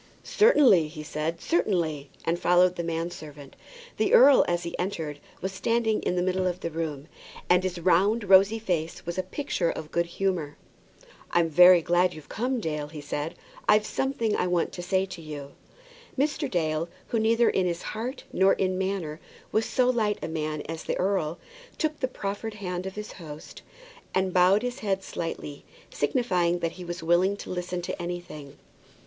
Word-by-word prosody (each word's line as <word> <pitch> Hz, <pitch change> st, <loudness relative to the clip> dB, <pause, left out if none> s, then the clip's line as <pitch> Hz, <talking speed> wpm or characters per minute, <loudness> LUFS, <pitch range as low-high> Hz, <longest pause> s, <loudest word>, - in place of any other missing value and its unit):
"Certainly," 275 Hz, -, +5 dB
he 155 Hz, 0 st, -8 dB
said, 155 Hz, +2 st, -3 dB
"certainly;" 165 Hz, -, 0 dB, 0.2 s
and 170 Hz, +1 st, 0 dB
followed 180 Hz, +1 st, +4 dB
the 170 Hz, -, -3 dB
man 165 Hz, +1 st, -2 dB
servant. 145 Hz, -4 st, -11 dB, 0.4 s
The -, -, +3 dB
earl, 285 Hz, -, +8 dB
as 175 Hz, 0 st, 0 dB
he 170 Hz, -, -5 dB
entered, 160 Hz, -6 st, -3 dB, 0.2 s
was 190 Hz, -, -2 dB
standing 220 Hz, +2 st, 0 dB
in -, -, -1 dB
the 180 Hz, -, +1 dB
middle 185 Hz, 0 st, 0 dB
of 180 Hz, +1 st, -3 dB
the 170 Hz, -, -3 dB
room, 155 Hz, -3 st, -4 dB, 0.4 s
and 180 Hz, 0 st, +4 dB
his 185 Hz, -1 st, -3 dB
round 190 Hz, +6 st, +3 dB
rosy 195 Hz, +2 st, +6 dB
face 175 Hz, -7 st, -3 dB
was 175 Hz, +2 st, -3 dB
a -, -, +3 dB
picture 185 Hz, -, -2 dB
of 155 Hz, -1 st, -6 dB
good 170 Hz, 0 st, 0 dB
humour. 170 Hz, -5 st, -2 dB, 0.7 s
"I'm 170 Hz, -1 st, +2 dB
very 180 Hz, +2 st, +7 dB
glad 175 Hz, +2 st, +2 dB
you've 155 Hz, -2 st, -12 dB
come, 250 Hz, +3 st, -1 dB
Dale," 150 Hz, -6 st, -3 dB
said 145 Hz, +2 st, -4 dB
he. -, -, -27 dB, 0.3 s
"I've 210 Hz, 0 st, +5 dB
something 235 Hz, -5 st, -1 dB
I 180 Hz, -, 0 dB
want 175 Hz, -1 st, 0 dB
to 175 Hz, -, -7 dB
say 190 Hz, +1 st, +1 dB
to 185 Hz, -3 st, -9 dB
you." 145 Hz, -3 st, -8 dB, 0.7 s
Mr. 290 Hz, +1 st, 0 dB
Dale, 160 Hz, -2 st, -1 dB, 0.2 s
who 230 Hz, -, +1 dB
neither 230 Hz, +2 st, +3 dB
in 180 Hz, -2 st, +1 dB
heart 225 Hz, +9 st, -5 dB
nor 190 Hz, +1 st, +4 dB
in 185 Hz, -1 st, 0 dB
manner 185 Hz, -5 st, -2 dB, 0.3 s
was 220 Hz, +1 st, +1 dB
so 250 Hz, -1 st, +2 dB
light 220 Hz, -4 st, +1 dB
a -, -, -2 dB
man 155 Hz, -2 st, -3 dB
as 160 Hz, 0 st, -6 dB
the -, -, -2 dB
earl, 180 Hz, -4 st, 0 dB, 0.4 s
took 310 Hz, -1 st, -1 dB
the 260 Hz, -, 0 dB
proffered 210 Hz, -2 st, -5 dB
hand 180 Hz, -2 st, -4 dB
of 190 Hz, -, -7 dB
his 210 Hz, 0 st, -6 dB
host, 155 Hz, -4 st, -10 dB, 0.5 s
and 190 Hz, -1 st, +1 dB
bowed 185 Hz, +4 st, +4 dB
his 245 Hz, +2 st, -3 dB
head 195 Hz, -3 st, -1 dB
slightly, 155 Hz, -5 st, -5 dB, 0.3 s
signifying 175 Hz, -, +1 dB
that 170 Hz, -1 st, -2 dB
he 180 Hz, -, -10 dB
was 175 Hz, -1 st, -6 dB
willing 180 Hz, +4 st, +3 dB
to -, -, -8 dB
listen 180 Hz, 0 st, -3 dB
to 175 Hz, -, -4 dB
anything. 175 Hz, -5 st, -7 dB
180 Hz, 180 wpm, -27 LUFS, 165-200 Hz, 0.7 s, earl